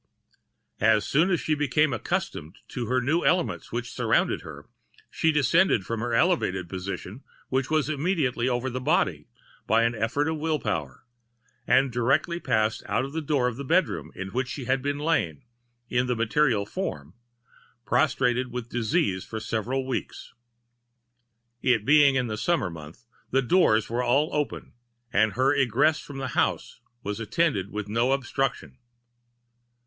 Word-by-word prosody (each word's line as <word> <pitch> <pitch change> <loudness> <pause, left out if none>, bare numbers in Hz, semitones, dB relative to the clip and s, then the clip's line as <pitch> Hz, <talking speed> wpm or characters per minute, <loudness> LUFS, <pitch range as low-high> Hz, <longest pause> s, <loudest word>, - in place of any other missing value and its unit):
As 110 0 +3
soon 160 +7 +2
as 175 -4 +2
she 155 - 0
became 150 0 +1
accustomed 90 -6 -3
to 120 -3 -4
her 130 +2 +2
new 150 +8 +1
elements 180 -1 0
which 120 +1 -4
surrounded - - +1
her, - - -10 0.5
she 160 - +2
descended 150 - +3
from 115 -1 -3
her 120 0 -1
elevated 115 - +1
position, 95 +5 -6 0.3
which 130 0 0
was 155 -2 +1
immediately 145 -5 0
over 125 +1 -1
the 130 0 -3
body, - - +1 0.4
by 115 +1 +4
an 115 +1 +2
effort 110 +5 0
of 160 0 -1
the - - -9
will 160 -1 +1
power, 85 - -4 0.6
and 135 -1 +4
directly 140 +8 +1
passed 110 -7 0
out - - 0
of 140 - -9
the 160 - -2
door 140 -4 +1
of 125 -2 -3
the 140 - -5
bedroom 175 +7 0
in 95 0 -5
which 125 +4 -2
she 130 0 -6
had 130 +1 0
lain, 145 - -1 0.4
in 125 +1 0
the 125 - 0
material 115 -1 +1
form, 80 - -5 0.7
prostrated 130 -4 +1
with 120 -1 -5
disease 105 -5 0
for 110 - -6
several 120 +5 -2
weeks. 130 - -5 1.3
It 120 -5 +2
being 145 -1 +6
in 125 -2 +1
a 105 - -3
summer 140 - 0
month, 80 +8 -11 0.2
the 135 +1 +2
doors 120 - +3
were 120 +2 -1
all 135 +5 +2
open, 150 -1 -3 0.4
and 110 +1 +3
her 130 +3 +2
egress 140 +3 +2
from 140 - -9
the 135 -1 -3
house - - -1 0.2
was 105 +2 -4
attended 115 - 0
with 105 0 -5
no 115 +5 +1
obstruction. 135 -1 -2
125 Hz, 160 wpm, -26 LUFS, 110-145 Hz, 1.3 s, being